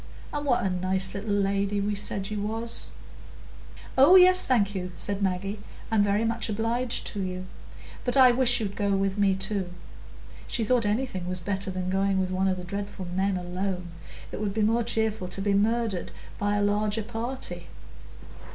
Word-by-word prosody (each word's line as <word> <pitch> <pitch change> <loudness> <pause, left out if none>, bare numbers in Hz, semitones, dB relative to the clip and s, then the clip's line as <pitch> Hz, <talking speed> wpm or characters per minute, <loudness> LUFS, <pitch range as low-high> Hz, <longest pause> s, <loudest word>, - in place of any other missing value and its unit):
and 290 0 -3
what 245 - +2
a 195 - +1
nice 185 +1 0
little 205 +2 -5
lady 200 0 +1
we 205 +1 -1
said 200 0 -2
you 210 -1 -2
was." 225 +3 -1 1.1
"Oh 275 +8 +7
yes, 370 0 +8
thank 205 -6 +2
you," 180 -2 -4
said 200 +2 -1
Maggie, 195 +2 -1 0.3
"I'm 220 -2 +4
very 205 +2 +2
much 230 0 -1
obliged 230 +3 -1
to 205 - -3
you. 185 0 -4 0.6
But 245 +2 -1
I 255 -2 +8
wish 245 0 +4
you'd 200 -3 -3
go 200 -1 0
with 195 +1 -1
me 195 -1 +3
too." 190 -1 -2 0.8
She 230 - 0
thought 230 -1 +2
anything 210 -5 -2
was 185 0 -2
better 195 +2 -2
than 185 0 -3
going 195 0 +1
with 185 0 -1
one 190 +1 +1
of 185 -1 +1
the 180 - -6
dreadful 200 +1 -5
men 190 0 +1
alone; 180 0 -3 0.4
it - - -5
would 205 -1 -2
be 220 - +1
more 225 +3 +2
cheerful 220 -4 -1
to 190 - -4
be 200 +1 +1
murdered 215 -2 0 0.3
by 205 0 +1
a 205 - +1
larger 210 +1 0
party. 225 -6 -5
205 Hz, 180 wpm, -27 LUFS, 190-225 Hz, 1.1 s, yes